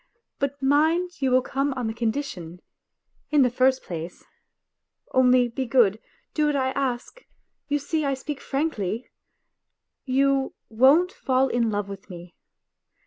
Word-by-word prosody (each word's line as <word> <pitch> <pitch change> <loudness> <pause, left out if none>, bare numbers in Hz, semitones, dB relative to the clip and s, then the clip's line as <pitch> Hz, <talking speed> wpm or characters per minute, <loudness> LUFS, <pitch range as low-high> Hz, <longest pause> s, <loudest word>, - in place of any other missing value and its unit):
But 280 0 -2
mind 320 +5 +2
you 265 - +2
will 255 0 +3
come 275 +2 -1
on 250 -2 -3
the 220 - -2
condition, 220 - -4 0.7
in 295 -3 +4
the 250 - +2
first 260 +1 +2
place 170 0 -7 0.9
(only 255 -1 +5
be 255 +2 -4
good, 230 -4 +3 0.3
do 300 -1 +1
what 295 - +1
I 260 -1 +1
ask 265 - -3 0.4
you 290 0 +1
see, 310 +2 -2
I 275 -1 0
speak 280 +1 -6
frankly), 255 - -2 1.0
you 275 0 +1
won't 275 +11 +4
fall 265 -4 +1
in 235 -2 +1
love 205 -1 -2
with 200 0 -10
me. 175 -1 -10
260 Hz, 140 wpm, -25 LUFS, 230-280 Hz, 1.0 s, only